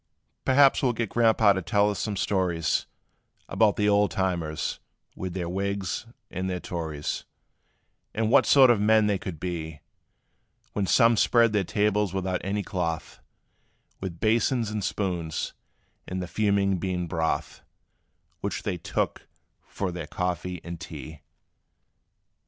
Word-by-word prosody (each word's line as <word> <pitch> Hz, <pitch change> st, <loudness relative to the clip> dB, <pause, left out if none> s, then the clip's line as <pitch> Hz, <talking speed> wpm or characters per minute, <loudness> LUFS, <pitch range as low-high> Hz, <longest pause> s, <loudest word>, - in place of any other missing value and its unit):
"Perhaps 135 Hz, +1 st, +5 dB
we 130 Hz, -, +3 dB
'll -, -, 0 dB
get 115 Hz, -2 st, -2 dB
Grandpa' 110 Hz, -3 st, +4 dB
to 95 Hz, -, -2 dB
tell 100 Hz, +4 st, +2 dB
us 100 Hz, -, -5 dB
some 105 Hz, -1 st, -2 dB
stories 90 Hz, -5 st, 0 dB, 0.6 s
About 110 Hz, -2 st, +3 dB
the 105 Hz, -, +1 dB
old 105 Hz, -1 st, +4 dB
times, 85 Hz, -4 st, -2 dB, 0.4 s
with 95 Hz, -1 st, -5 dB
their 90 Hz, -2 st, -2 dB
Wigs 100 Hz, +3 st, -2 dB, 0.2 s
and 95 Hz, +1 st, -3 dB
their 90 Hz, -1 st, -2 dB
Tories; 80 Hz, -5 st, -4 dB, 0.9 s
And 110 Hz, 0 st, 0 dB
what -, -, +5 dB
sort 130 Hz, -3 st, +7 dB
of 110 Hz, -4 st, +2 dB
men 110 Hz, 0 st, +4 dB
they 100 Hz, -2 st, +1 dB
could 85 Hz, -5 st, -6 dB
be; 80 Hz, -4 st, -4 dB, 0.9 s
When 100 Hz, -2 st, -1 dB
some 115 Hz, +1 st, +5 dB
spread 115 Hz, -1 st, +4 dB
their 105 Hz, -2 st, +2 dB
tables 105 Hz, 0 st, 0 dB
without 95 Hz, -1 st, -1 dB
any 100 Hz, +1 st, -1 dB
cloth, 85 Hz, -4 st, -3 dB, 0.8 s
With 90 Hz, -3 st, -6 dB
basins 115 Hz, +1 st, +1 dB
and 105 Hz, -1 st, -3 dB
spoons, 90 Hz, -6 st, -2 dB, 0.5 s
and 95 Hz, -, -3 dB
the 90 Hz, -, -4 dB
fuming 100 Hz, -2 st, +1 dB
bean 90 Hz, -1 st, -2 dB
broth 80 Hz, -1 st, -2 dB, 0.8 s
Which 100 Hz, +2 st, -3 dB
they 95 Hz, -5 st, -2 dB
took -, -, -2 dB, 0.4 s
for 95 Hz, -2 st, -3 dB
their 85 Hz, -3 st, -6 dB
coffee 90 Hz, 0 st, -3 dB
and 85 Hz, -1 st, -7 dB
tea. 80 Hz, -1 st, -9 dB
95 Hz, 140 wpm, -26 LUFS, 85-105 Hz, 0.9 s, sort